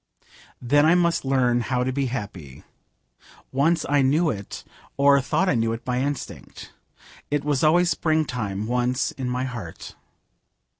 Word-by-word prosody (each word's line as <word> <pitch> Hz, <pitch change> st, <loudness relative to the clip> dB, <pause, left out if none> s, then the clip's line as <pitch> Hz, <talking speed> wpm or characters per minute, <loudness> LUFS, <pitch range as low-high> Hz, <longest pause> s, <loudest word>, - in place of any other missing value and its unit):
Then 145 Hz, +4 st, +3 dB
I 160 Hz, +3 st, +5 dB
must 170 Hz, -4 st, +1 dB
learn 125 Hz, -3 st, +2 dB
how 125 Hz, +2 st, -1 dB
to 130 Hz, +1 st, -2 dB
be 140 Hz, 0 st, -1 dB
happy. 100 Hz, -, -7 dB, 0.9 s
Once 155 Hz, +4 st, +1 dB
I 145 Hz, -1 st, +3 dB
knew 150 Hz, +5 st, +2 dB
it, 100 Hz, -2 st, -7 dB, 0.3 s
or 140 Hz, 0 st, +5 dB
thought 190 Hz, +8 st, 0 dB
I -, -, +3 dB
knew 115 Hz, -1 st, 0 dB
it, 115 Hz, -, -7 dB
by 125 Hz, 0 st, -1 dB
instinct. 140 Hz, -1 st, -6 dB, 0.6 s
It 145 Hz, -1 st, -1 dB
was 145 Hz, -2 st, 0 dB
always 175 Hz, +3 st, +4 dB
springtime 125 Hz, -, -1 dB
once 125 Hz, +3 st, 0 dB
in 130 Hz, -2 st, -5 dB
my 125 Hz, +1 st, -2 dB
heart. 115 Hz, -10 st, -7 dB
130 Hz, 150 wpm, -24 LUFS, 120-145 Hz, 0.9 s, I